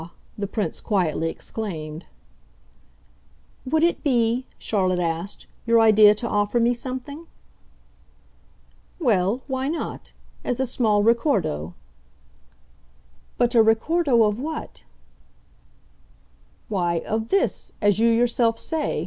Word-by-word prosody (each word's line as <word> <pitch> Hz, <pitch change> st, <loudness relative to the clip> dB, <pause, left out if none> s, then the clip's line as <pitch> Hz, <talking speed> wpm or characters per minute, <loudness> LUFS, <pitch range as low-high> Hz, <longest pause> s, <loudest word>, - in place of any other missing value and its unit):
the 205 Hz, -1 st, -4 dB
Prince 210 Hz, 0 st, -3 dB
quietly 170 Hz, -6 st, 0 dB
exclaimed. 165 Hz, -6 st, -6 dB, 1.6 s
"Would 315 Hz, +4 st, +1 dB
it 345 Hz, -, +1 dB
be," 245 Hz, -2 st, +1 dB
Charlotte 185 Hz, -4 st, 0 dB
asked, 170 Hz, +2 st, -3 dB, 0.2 s
"your 230 Hz, 0 st, +5 dB
idea 215 Hz, -1 st, +6 dB
to 235 Hz, +3 st, -4 dB
offer 205 Hz, +2 st, 0 dB
me 235 Hz, +1 st, +3 dB
something?" 260 Hz, +6 st, -7 dB, 1.7 s
"Well, 195 Hz, -, +1 dB
why 265 Hz, -1 st, -2 dB
not 320 Hz, +3 st, -5 dB, 0.3 s
as 245 Hz, -, -2 dB
a 265 Hz, -, +1 dB
small 220 Hz, -4 st, +1 dB
ricordo." 205 Hz, -, 0 dB, 1.6 s
"But 240 Hz, 0 st, +1 dB
a 230 Hz, -, +6 dB
ricordo 235 Hz, +3 st, +3 dB
of 210 Hz, +1 st, 0 dB
what?" 310 Hz, +3 st, -6 dB, 1.8 s
"Why, 175 Hz, -5 st, -1 dB
of 220 Hz, +1 st, -2 dB
'this' 395 Hz, -, 0 dB
as 205 Hz, -1 st, +2 dB
you 230 Hz, +1 st, +4 dB
yourself 230 Hz, 0 st, +2 dB
say. 315 Hz, +5 st, -2 dB
225 Hz, 105 wpm, -23 LUFS, 200-255 Hz, 1.8 s, idea